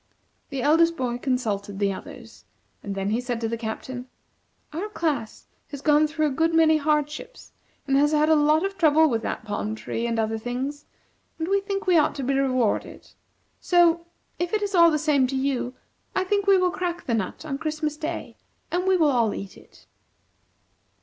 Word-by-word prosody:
The 275 -3 -3
eldest 330 +3 +4
boy 245 -3 -2
consulted 210 -7 -2
the 200 -1 +1
others, - - -11 0.4
and 200 -1 -5
then 195 +1 -2
he 230 +3 0
said 245 -2 -3
to 225 - 0
the 230 - -2
Captain: 245 +3 -6 0.7
"Our 370 +7 -4
class 295 - -3 0.2
has 285 -1 -8
gone 300 0 +4
through 310 0 -1
a 295 - +1
good 325 +4 +1
many 315 -1 +5
hardships, 300 - -2 0.3
and 275 - +1
has 295 +1 +3
had 305 0 +3
a 320 - +5
lot 305 +3 +3
of 390 -1 -5
trouble 315 -1 +5
with 230 -6 0
that - - -4
palm 210 +1 -3
tree 230 +1 -3
and 230 -1 -1
other 220 0 -1
things, 260 +5 -4 0.5
and 320 - -3
we 395 +1 +2
think 395 0 -3
we 360 -3 +5
ought 295 - +1
to 275 - -4
be 270 +2 0
rewarded. 255 -5 -1 0.5
So, 340 -1 +3 0.3
if 350 +2 -2
it 425 -1 +1
is 400 -1 -3
all 340 -2 +7
the 305 - +1
same 290 -4 +2
to 270 - -4
you, 265 -2 -1 0.4
I 375 - +2
think 400 +1 0
we 395 -1 +6
will 365 -1 +2
crack 350 -1 -3
the 235 - -1
nut 220 +7 -3
on 275 -3 -4
Christmas 310 -1 -2
Day 320 +2 -5 0.3
and 360 +2 -1
we 380 -1 +4
all 280 -8 +3
will 210 - -2
eat 195 -1 -7
it." - - -19
295 Hz, 195 wpm, -25 LUFS, 245-335 Hz, 0.7 s, all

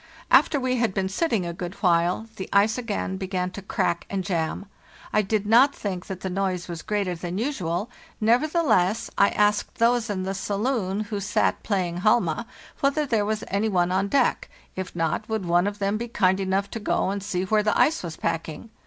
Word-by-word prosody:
After 290 - +5
we 255 -1 0
had 230 -5 0
been 190 -1 0
sitting 220 - 0
a 170 - -4
good 175 +2 -6
while 175 +3 +2
the 190 - -6
ice 205 +2 +4
again 210 -5 -3
began 185 -1 -2
to 200 - -8
crack 170 -2 -1
and 195 -1 -2
jam. 170 0 -2 0.5
I 215 - +4
did 210 0 -1
not 245 +6 +5
think 185 -4 -4
that 190 -2 -6
the - - -3
noise 185 -2 -1
was 170 -2 -6
greater 200 -3 -1
than 175 +1 -5
usual; 205 - -2 0.3
neverthe 285 +10 +2
less, 185 -3 +2
I 200 - +5
asked 210 0 +1
those 235 0 +2
in 190 -2 -2
the 190 +1 -2
saloon, 200 0 -1
who 210 -1 -4
sat 205 +1 0
playing 180 -5 -1
halma, 215 +1 +2 0.3
whether 280 +2 +1
there 225 -6 +1
was 215 0 -2
any 200 +3 0
one 180 -3 +1
on 190 +2 +1
deck; 260 +4 +1 0.3
if 185 -2 -5
not, 165 +6 -1
would 220 -4 -2
one 175 +2 +3
of 205 0 -3
them 200 +1 0
be 235 +2 -4
kind 190 -4 +2
enough 195 +1 -1
to 225 - -4
go 205 - 0
and 200 0 -3
see 185 -2 -2
where 210 +3 +2
the 210 0 +1
ice 315 +2 +3
was 165 -2 -6
packing. 165 +5 -4
200 Hz, 205 wpm, -25 LUFS, 185-220 Hz, 0.5 s, After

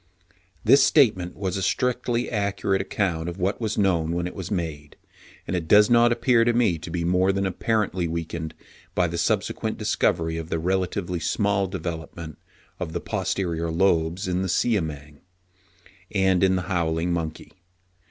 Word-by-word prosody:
This 140 0 +6
statement 110 - +3
was 95 -1 -2
a - - -2
strictly 120 +4 0
accurate 100 -2 0
account 90 -4 -1
of 85 - -7
what 95 +5 -1
was 110 -2 -2
known 85 -5 +1
when 85 0 -1
it 90 - -5
was 95 -2 -6
made; 80 -6 -4 0.5
and - - -2
it 85 -3 -3
does 105 +4 +6
not 120 0 +5
appear 120 0 +3
to 120 0 +2
me 110 -9 +2
to - - -8
be 85 0 -2
more 90 +2 +3
than 100 0 -1
apparently 95 -1 0
weakened 80 -1 -4 0.4
by 90 - +3
the 85 0 -3
subsequent - - -1
discovery 80 0 0
of 80 0 -6
the 85 - -1
relatively 90 +1 -1
small 100 +3 0
development 85 -3 -6 0.4
of 80 - -4
the 85 - -1
posterior 85 -3 -2
lobes 85 0 +1
in 90 0 0
the 95 - -2
Siamang 80 -9 -1 0.9
and 95 -2 +2
in 95 0 +4
the 90 - -1
Howling 85 -2 0
monkey. 80 -2 -4
90 Hz, 160 wpm, -24 LUFS, 85-100 Hz, 0.9 s, This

